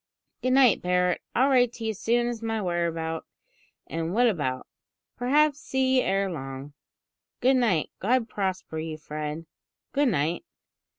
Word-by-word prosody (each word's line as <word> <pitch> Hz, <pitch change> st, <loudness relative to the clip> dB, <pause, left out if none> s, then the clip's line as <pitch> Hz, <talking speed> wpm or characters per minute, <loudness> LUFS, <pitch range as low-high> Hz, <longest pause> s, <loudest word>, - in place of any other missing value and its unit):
"Good 255 Hz, 0 st, +1 dB
night, 260 Hz, -5 st, +5 dB
Barret. 180 Hz, 0 st, +1 dB
I'll 265 Hz, +3 st, +4 dB
write 245 Hz, -3 st, +4 dB
to 230 Hz, -, -8 dB
you 220 Hz, 0 st, -1 dB
soon 235 Hz, +4 st, +1 dB
as 240 Hz, -1 st, -3 dB
to 230 Hz, -, -7 dB
my 225 Hz, 0 st, -1 dB
whereabout 170 Hz, -3 st, -2 dB, 0.6 s
and 165 Hz, +3 st, -3 dB
what 245 Hz, +2 st, +4 dB
about. 145 Hz, -, -1 dB, 0.5 s
Perhaps 290 Hz, +4 st, +2 dB
see 265 Hz, -2 st, +1 dB
you 255 Hz, -, +4 dB
ere 195 Hz, +1 st, +1 dB
long." 135 Hz, -4 st, -6 dB, 0.7 s
"Good 260 Hz, +1 st, +4 dB
night. 215 Hz, -11 st, +1 dB
God 235 Hz, +3 st, +1 dB
prosper 190 Hz, -6 st, -3 dB
you, 160 Hz, -1 st, -5 dB
Fred. 150 Hz, +1 st, -5 dB, 0.5 s
Good 285 Hz, -1 st, +2 dB
night." 165 Hz, -, 0 dB
195 Hz, 155 wpm, -26 LUFS, 160-245 Hz, 0.7 s, night